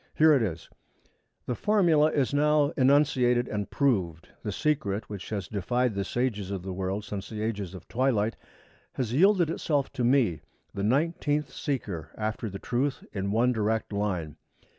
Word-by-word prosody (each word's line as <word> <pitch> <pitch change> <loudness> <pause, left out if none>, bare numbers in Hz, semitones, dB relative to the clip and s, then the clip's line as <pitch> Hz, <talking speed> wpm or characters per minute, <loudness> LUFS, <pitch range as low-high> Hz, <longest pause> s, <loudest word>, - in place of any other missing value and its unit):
Here 155 0 +6
it 135 - +3
is: 85 -7 -3 0.8
'_The 125 - -1
formula 170 - +3
is 140 -3 0
now 150 0 +3
enunciated 130 -3 +3
and 105 -1 -3
proved. 95 - 0
The 105 - -3
secret 110 -7 -1
which 100 -2 -6
has 100 -4 -3
defied 120 +4 0
the 100 0 -1
sages 105 -4 -2
of 95 -3 -4
the 95 0 -4
world 95 +3 -3
since 100 -2 -6
the 110 -1 -4
ages 100 -5 -3
of 90 - -11
twilight, 115 -3 +1 0.6
has 120 -3 -2
yielded 175 +2 +4
itself 145 -5 -1
to 130 -3 -2
me, 120 - +3 0.3
the 100 - -4
nineteenth 145 +5 0
seeker 105 - -4
after 110 +1 -3
the 100 - -6
truth 125 +6 -2
in 100 -1 -2
one 120 +4 +2
direct 110 -1 -1
line. 90 -7 -2
115 Hz, 160 wpm, -28 LUFS, 100-140 Hz, 0.8 s, Here